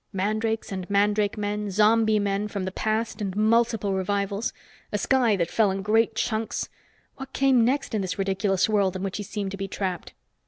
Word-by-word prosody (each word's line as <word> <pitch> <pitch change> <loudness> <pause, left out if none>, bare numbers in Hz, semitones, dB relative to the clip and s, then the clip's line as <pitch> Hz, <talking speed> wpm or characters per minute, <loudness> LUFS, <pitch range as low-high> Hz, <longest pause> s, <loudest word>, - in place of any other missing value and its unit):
Mandrakes 215 +3 -1
and 185 -1 -5
mandrake 205 +1 +2
men, 210 0 -2
zombie 215 +2 +4
men, 200 0 0
from 200 -2 -4
the 190 - -3
past 220 +2 -2
and 195 -2 -3
multiple 220 -1 +2
revivals! 200 +2 -1 0.4
A 210 - 0
sky 240 0 +2
that 170 -3 -1
fell 220 -3 +3
in 195 0 -3
great 225 +2 +2
chunks. 220 0 -2 0.5
What 270 -1 -9
came 265 -3 +4
next 270 +3 0
in 215 - 0
this 180 -1 -3
ridiculous 195 0 +1
world 200 -3 +1
in 185 - -4
which 195 -1 -3
he 210 - -4
seemed 200 -1 -4
to 195 - -5
be 195 0 -4
trapped? 185 -3 -4
205 Hz, 190 wpm, -25 LUFS, 195-220 Hz, 0.5 s, zombie